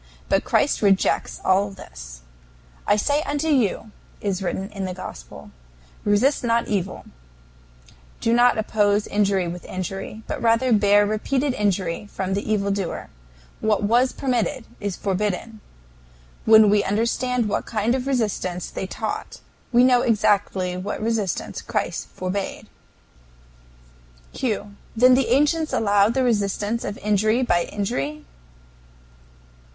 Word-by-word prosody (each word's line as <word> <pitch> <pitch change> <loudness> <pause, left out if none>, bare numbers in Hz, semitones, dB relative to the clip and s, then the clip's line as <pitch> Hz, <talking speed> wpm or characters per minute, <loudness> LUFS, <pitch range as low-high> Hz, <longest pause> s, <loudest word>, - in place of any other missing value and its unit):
But - - +2
Christ - - +1
rejects 195 -2 +2
all 195 +2 +3
this. - - -11 0.7
"I - - +5
say 285 +8 +1
unto 295 +1 -2
you," 230 -6 +1 0.3
is 195 -2 -2
written 190 +1 -3
in 195 -2 -4
the 185 -1 -4
Gospel, - - -10 0.5
"resist 215 +8 +2
not 235 0 +1
evil," 195 -3 -3 1.1
do 230 - +1
not 240 0 +4
oppose 210 -1 +1
injury 200 -3 +1
with 175 +1 -6
injury, 195 +4 -6
but - - -5
rather 235 +2 +3
bear 205 0 +5
repeated 255 +6 0
injury 195 -3 -1
from 190 0 -3
the 200 +2 -2
evil 200 -2 +1
doer. 195 -3 -3 0.5
What 215 -1 +1
was 240 +5 +3
permitted 255 -1 -1
is 200 -3 -3
forbidden. 210 +2 -2 0.8
When 220 -2 +7
we 205 -1 +3
understand 230 +3 0
what 205 - -2
kind 220 +1 0
of 260 0 -2
resistance 210 -8 -2
they 190 - -4
taught, - - -5 0.3
we 245 0 +5
know 250 -1 +5
exactly 200 -5 +1
what 195 +3 -4
resistance 215 -5 -2
Christ - - -3
forbade. 190 +2 -4 1.7
Q. 210 -4 -3 0.2
Then 250 +3 +6
the 260 +1 +3
ancients 300 +3 +2
allowed 205 +1 +3
the 265 - +2
resistance 210 -1 0
of 205 - -4
injury 215 +4 +2
by 175 -7 +2
injury? 150 -7 -3
210 Hz, 130 wpm, -23 LUFS, 195-235 Hz, 1.7 s, When